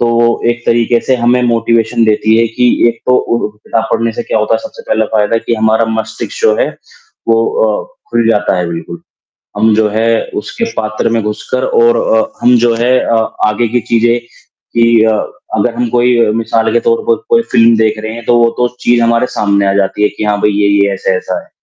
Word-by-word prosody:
तो 120 - +2
वो 120 0 +3 0.2
एक 120 0 -4
तरीके 120 0 +2
से 130 - +2
हमें 125 +1 +1
मोटिवेशन 115 -1 +1
देती 110 0 +2
है 115 - +3
कि 125 - +3 0.2
एक 115 0 -4
तो 125 - +4
उ 120 -3 -1
किताब 110 +1 -3
पढ़ने 115 0 0
से - - -4
क्या 110 - -1
होता 110 +1 0
है, - - +1
सबसे - - -10
पहला 110 0 +1
फ़ायदा 110 +2 +2
कि 115 - -2
हमारा 110 +1 +1
मस्तिष्क 110 0 -5
जो 460 +1 +3
है - - +1 0.6
वो - - +3 0.2
अ, - - -2 0.3
खुल 115 -1 +1
जाता 105 -3 +1
है 90 - -1
बिल्कुल, 85 - -7 0.6
हम 110 +1 +3
जो 110 -1 +2
है 110 +2 -1 0.4
उसके 230 - -4
पात्र 110 0 -2
में 115 -1 0
घुसकर 105 0 -3 0.2
और 470 +1 +4
अ, - - +1 0.2
हम 125 0 +5
जो 115 - +2
है 125 +2 +2
अ, 115 - 0 0.3
आगे 115 +2 0
की 120 +2 0
चीज़ें 115 +1 +3 0.6
कि 115 -1 +4
अ, 110 - +3 0.4
अगर 115 +3 0
हम 120 0 -2
कोई 120 +1 +2
अ, - - +1
मिसाल 115 0 0
के - - +2
तौर 460 -1 +1
पर 460 - +3
कोई 235 0 +4
फ़िल्म 115 -1 +4
देख 110 -1 +1
रहे 110 - -4
हैं, 115 0 -9
तो 120 - +3
वो 115 - +4
तो 125 - +2
चीज़ 120 0 +2
हमारे 115 +1 +2
सामने 100 -1 +1
आ - - +2
जाती 100 +1 0
है 105 - +4
कि, 105 - -6
हाँ 105 -1 0
भई, 105 - +2
ये-ये 100 -1 +2
ऐसा-ऐसा 95 -1 -2
है, - - -19
115 Hz, 220 wpm, -12 LUFS, 110-120 Hz, 0.6 s, हम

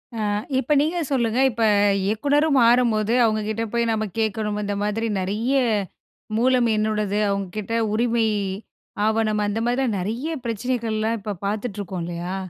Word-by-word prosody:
ஆ - - -4 0.4
இப்ப 270 +3 +1
நீங்க 320 +4 0
சொல்லுங்க 240 -3 +1
இப்ப 230 0 -2 0.4
இயக்குனரும் 285 +8 +2
மாறும்போது, 230 -2 +3
அவங்க 215 -1 +2
கிட்ட 220 +1 -2
போய் 235 -1 +1
நாம 220 -1 -1
கேட்கணும். 215 -1 -1
இந்த 205 0 -2
மாதிரி 215 +2 -1
நிறைய 210 +7 -1 0.8
மூலம் 250 0 +3
என்னோடது. 210 -1 0
அவங்க 200 -1 -1
கிட்ட 215 +2 -4 0.2
உரிமை 230 0 +1 0.8
ஆவணம், 220 -1 +1
அந்த 205 +2 -1
மாதிரி 245 +2 +1
எல்லாம் 225 -6 0
நிறைய 230 - -3 0.2
பிரச்சனைகள்லாம் 230 -1 -1
இப்போ 205 +1 -4
பார்த்துட்டு 210 +1 -3
இருக்கோம், 185 -2 -5
இல்லையா? 175 +2 -4
220 Hz, 145 wpm, -23 LUFS, 210-235 Hz, 0.8 s, மாறும்போது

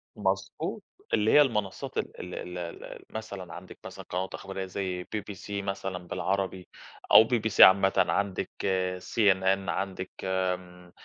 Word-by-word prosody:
مضبوط، 95 -1 -2 0.3
اللي 105 +1 +3
هي 150 - +8
المنصّات 105 -9 -1
ال - - -3
ال 90 0 -6
ال 90 0 -6 0.3
ال - - -10
مثلًا 100 -5 -7
عندِك 90 +1 -10
مثلًا - - -9
قنوات 95 +1 -3
إخبارية 95 0 -5
زي 95 -1 -3
BBC 105 +1 -7
مثلًا 95 -1 -3
بالعربي 95 0 -2 0.4
أو - - +10
BBC 110 -2 -1
عامةً، 95 0 +7
عندِك 100 -2 +1 0.5
CNN، 95 -2 +2
عندِك 95 -1 -3
آمم، 90 -1 -3
95 Hz, 130 wpm, -28 LUFS, 90-100 Hz, 0.5 s, أو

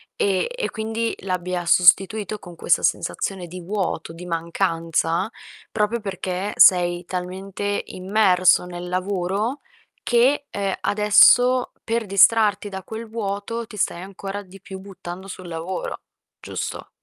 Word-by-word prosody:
e 195 - +1
e - - -2
quindi 225 +1 -2
l'abbia 180 -1 -3
sostituito 195 +4 +4
con 175 -2 -12
questa - - +2
sensazione 190 -3 -1
di 180 +2 -8
vuoto, 180 -3 -3
di 170 +2 -10
mancanza 165 +1 -1 0.4
proprio 215 +2 0
perché 190 -1 -4
sei 175 -1 +5
talmente 190 +3 -4
immerso 185 -2 +3
nel 175 0 -7
lavoro 195 +7 -2 0.4
che, 260 +4 +3
ehm, 195 -1 -2
adesso 245 +5 +5
per 230 0 -1
distrarti 205 +1 +4
da 190 -1 -7
quel 220 +4 -7
vuoto 220 +1 -4
ti 210 - -11
stai 175 -2 -1
ancora 195 +1 -6
di 190 +1 -15
più 190 0 -9
buttando 190 -1 -9
sul 185 -1 -9
lavoro, 170 +2 -5 0.4
giusto? - - -6
195 Hz, 125 wpm, -22 LUFS, 180-210 Hz, 0.4 s, sei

